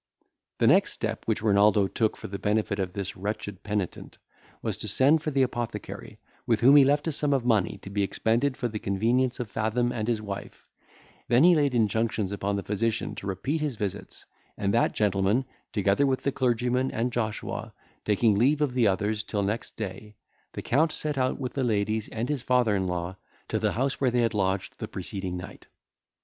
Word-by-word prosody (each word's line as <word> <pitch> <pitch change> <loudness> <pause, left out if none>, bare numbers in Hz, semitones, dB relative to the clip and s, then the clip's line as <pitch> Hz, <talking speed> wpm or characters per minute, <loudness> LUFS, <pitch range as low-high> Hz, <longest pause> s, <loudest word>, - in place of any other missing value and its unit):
The - - +2
next - - +4
step - - -4
which - - 0
Renaldo 105 -1 +4
took 110 +3 0
for - - -10
the 100 0 -6
benefit 105 -1 0
of 90 -2 -2
this 100 -2 -4
wretched 105 0 -5
penitent, 100 -3 -4 0.5
was - - -1
to - - -4
send 140 +9 +4
for 155 - -2
the 135 -2 +2
apothecary, 120 -2 -5 0.3
with 115 -2 +2
whom 135 +4 +7
he 145 - +9
left 145 +3 +2
a - - +1
sum 145 0 0
of 125 -3 -1
money 105 -5 +2
to - - -8
be 100 0 0
expended 115 +7 0
for 120 - -1
the 105 -2 -5
convenience 120 +7 +1
of 115 -4 -4
Fathom 115 +3 0
and 110 -2 -3
his 115 -2 +1
wife; 100 -2 -7 0.6
then 120 +4 +4
he 180 +1 +7
laid 145 -5 +2
injunctions 110 -2 +1
upon 100 0 -2
the 100 - -3
physician 110 +2 -1
to 100 - -7
repeat 135 - -2
his 150 -5 -1
visits; 105 -4 -5 0.3
and 100 0 0
that 115 - +2
gentleman, 105 +4 +2 0.3
together 105 +7 +2
with 130 -1 0
the 140 - +1
clergyman 125 0 +1
and 120 +2 -2
Joshua, 110 -3 -3 0.3
taking 105 +1 +3
leave 130 +9 +3
of 145 -4 +1
the 125 -3 +3
others 105 +2 0
till 105 -1 -2
next 105 +4 -3
day, 105 0 -6 0.4
the - - -6
Count 155 +6 +2
set 150 -1 -3
out 130 0 0
with 125 -2 -4
the 135 - -1
ladies 110 -1 0
and 115 +2 -3
his 145 -4 -2
father 125 -4 +2
in 95 -1 0
law 90 0 -3 0.3
to - - 0
the - - 0
house 135 +4 -1
where 130 - +4
they 120 0 +1
had 115 -1 +1
lodged 95 -2 -1
the - - -4
preceding 95 -2 -5
night. 90 +2 -10
110 Hz, 200 wpm, -27 LUFS, 100-125 Hz, 0.6 s, he